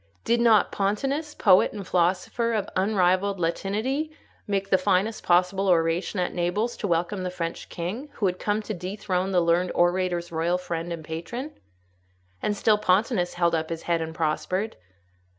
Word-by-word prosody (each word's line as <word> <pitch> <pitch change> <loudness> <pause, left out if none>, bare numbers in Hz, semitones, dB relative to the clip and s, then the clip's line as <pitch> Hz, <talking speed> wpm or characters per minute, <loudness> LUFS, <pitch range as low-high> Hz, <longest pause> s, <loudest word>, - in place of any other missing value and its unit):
Did 235 0 +2
not 225 -4 +5
Pontanus, 270 +10 -1
poet 185 - +4
and 200 -2 -6
philosopher 185 +6 +1
of 210 -2 -1
unrivalled 190 0 +2
Latinity, 215 - -1 0.4
make 195 -1 -1
the 190 - +5
finest 195 +3 +1
possible 180 +2 +2
oration 170 +2 +1
at 180 - -1
Naples 185 +7 -1
to 205 - -2
welcome 175 +3 0
the 185 - -2
French 170 -2 -5
king, 205 - -5
who 205 - -2
had 180 -1 0
come 210 +1 -1
to 215 - -4
dethrone 185 0 -2
the 180 -2 +3
learned 170 +2 +2
orator's 175 -1 +1
royal 170 +2 +1
friend 170 -1 -4
and 165 -2 -5
patron? 235 - -5 0.9
and 205 -1 -1
still 210 0 +3
Pontanus 190 -1 +1
held 170 -1 +2
up 160 -1 -1
his 165 -1 -5
head 170 -1 0
and 160 0 -5
prospered. 185 +6 -1
185 Hz, 165 wpm, -25 LUFS, 175-210 Hz, 0.9 s, not